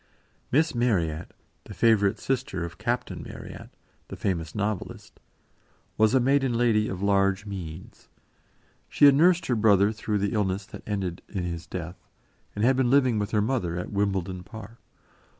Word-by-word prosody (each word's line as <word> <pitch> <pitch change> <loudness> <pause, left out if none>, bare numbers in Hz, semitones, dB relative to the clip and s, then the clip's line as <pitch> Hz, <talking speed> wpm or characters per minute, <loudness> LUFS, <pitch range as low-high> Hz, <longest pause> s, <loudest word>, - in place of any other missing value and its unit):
Miss 160 +5 +2
Marryat 90 -11 0 0.3
the 105 - -10
favourite 100 0 +3
sister 120 -10 -2
of 85 - -10
Captain - - -2
Marryat, - - -10 0.4
the - - -7
famous 85 -5 -3
novelist 105 -2 -4 0.8
was 110 +3 +3
a - - +5
maiden 135 -1 +2
lady 115 -3 +2
of 95 +1 -5
large 100 0 +2
means. 90 -4 -8 0.8
She - - +4
had 140 - +8
nursed 170 +4 +4
her 125 - +1
brother 105 -2 +4
through 110 -1 -2
the 100 +1 -1
illness 100 -2 -1
that - - -11
ended 95 -4 -3
in 95 -4 -3
his 85 -1 -5
death, - - -7 0.5
and 105 +2 +1
had 130 +2 +4
been 130 -2 +2
living 130 -4 +3
with 105 0 -2
her 105 -2 +1
mother 105 -8 -1
at 90 - -5
Wimbledon 95 -3 -1
Park. 110 +3 -11
105 Hz, 160 wpm, -26 LUFS, 95-120 Hz, 0.8 s, had